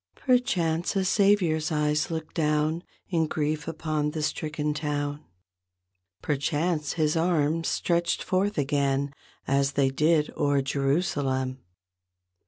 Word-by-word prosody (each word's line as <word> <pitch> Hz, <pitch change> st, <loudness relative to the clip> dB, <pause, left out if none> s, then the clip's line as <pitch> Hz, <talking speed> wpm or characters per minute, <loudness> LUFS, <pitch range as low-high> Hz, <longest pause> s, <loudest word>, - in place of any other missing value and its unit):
Perchance 180 Hz, -10 st, +1 dB
a 190 Hz, -1 st, +1 dB
Savior's 180 Hz, -6 st, +2 dB
eyes 150 Hz, 0 st, +1 dB
looked 160 Hz, -1 st, -5 dB
down 155 Hz, +1 st, +1 dB, 0.3 s
In 165 Hz, -4 st, +1 dB
grief 150 Hz, 0 st, -2 dB
upon 155 Hz, -2 st, -1 dB
the 155 Hz, 0 st, -4 dB
stricken 150 Hz, 0 st, -2 dB
town. 145 Hz, -1 st, -3 dB, 1.0 s
Perchance 150 Hz, +2 st, 0 dB
His 155 Hz, -1 st, +1 dB
arms 165 Hz, -1 st, +1 dB
stretched 170 Hz, 0 st, 0 dB
forth 195 Hz, +3 st, 0 dB
again 140 Hz, -1 st, 0 dB, 0.3 s
As 140 Hz, +1 st, +2 dB
they 135 Hz, -1 st, +2 dB
did 150 Hz, +2 st, +2 dB
o'er 145 Hz, -1 st, +1 dB
Jerusalem. 135 Hz, -2 st, 0 dB
150 Hz, 110 wpm, -27 LUFS, 145-165 Hz, 1.0 s, Savior's